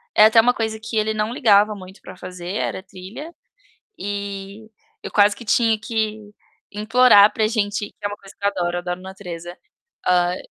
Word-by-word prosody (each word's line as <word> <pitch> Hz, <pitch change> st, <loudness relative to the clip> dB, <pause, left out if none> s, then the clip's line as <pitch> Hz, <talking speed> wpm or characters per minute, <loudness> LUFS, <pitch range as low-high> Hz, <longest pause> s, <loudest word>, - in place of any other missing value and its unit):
é 215 Hz, -, +8 dB
até 225 Hz, +1 st, +6 dB
uma 245 Hz, +2 st, +3 dB
coisa 220 Hz, -2 st, -3 dB
que 225 Hz, 0 st, -5 dB
ele 215 Hz, 0 st, +1 dB
não 215 Hz, +1 st, -2 dB
ligava 210 Hz, -4 st, +4 dB
muito 190 Hz, 0 st, -13 dB
pra 185 Hz, -, -12 dB
fazer, 180 Hz, +1 st, -7 dB
era 190 Hz, -, -3 dB
trilha, 200 Hz, -, -10 dB, 0.7 s
eh, 200 Hz, +1 st, -6 dB, 0.3 s
eu -, -, -6 dB
quase 205 Hz, 0 st, +4 dB
que -, -, -11 dB
tinha 225 Hz, +1 st, +2 dB
que 220 Hz, -1 st, -2 dB, 0.5 s
implorar 215 Hz, 0 st, +5 dB
para 220 Hz, -, 0 dB
a -, -, +4 dB
gente 205 Hz, -2 st, -1 dB
que -, -, -26 dB
é -, -, -1 dB
uma 205 Hz, -, -7 dB
coisa 195 Hz, -1 st, -16 dB
que -, -, -11 dB
eu -, -, +5 dB
adoro 175 Hz, -3 st, -2 dB
eu -, -, -3 dB
adoro, 180 Hz, 0 st, -5 dB
natureza. 180 Hz, -2 st, -8 dB, 0.5 s
Ai, 180 Hz, 0 st, +2 dB
205 Hz, 195 wpm, -21 LUFS, 185-220 Hz, 0.7 s, é